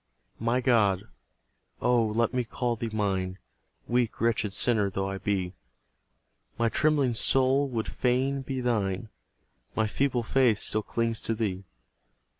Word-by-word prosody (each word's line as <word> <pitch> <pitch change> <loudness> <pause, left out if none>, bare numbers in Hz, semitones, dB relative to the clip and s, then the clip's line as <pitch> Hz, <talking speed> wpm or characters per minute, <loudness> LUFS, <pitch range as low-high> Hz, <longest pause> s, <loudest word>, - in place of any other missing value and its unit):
My 115 +3 +1
God 105 -7 +3 0.8
(oh, 125 -1 +3
let 110 +2 0
me 125 -1 +1
call 120 +1 -2
Thee 115 0 -4
mine, 95 -3 -1 0.5
Weak, 120 -1 0
wretched 110 -3 +1
sinner 105 -1 +2
though 95 0 -2
I 95 0 -4
be), 95 -3 -1 1.0
My 115 0 +2
trembling 145 -2 +2
soul 135 +4 +3
would 115 -3 -2
fain 130 +2 0
be 130 -1 -4
Thine; 110 -3 -1 0.7
My 110 - +2
feeble 125 +2 0
faith 120 -2 +3
still 110 0 0
clings 115 +1 -1
to 115 - -1
Thee. 100 -4 -3
115 Hz, 135 wpm, -28 LUFS, 105-125 Hz, 1.0 s, God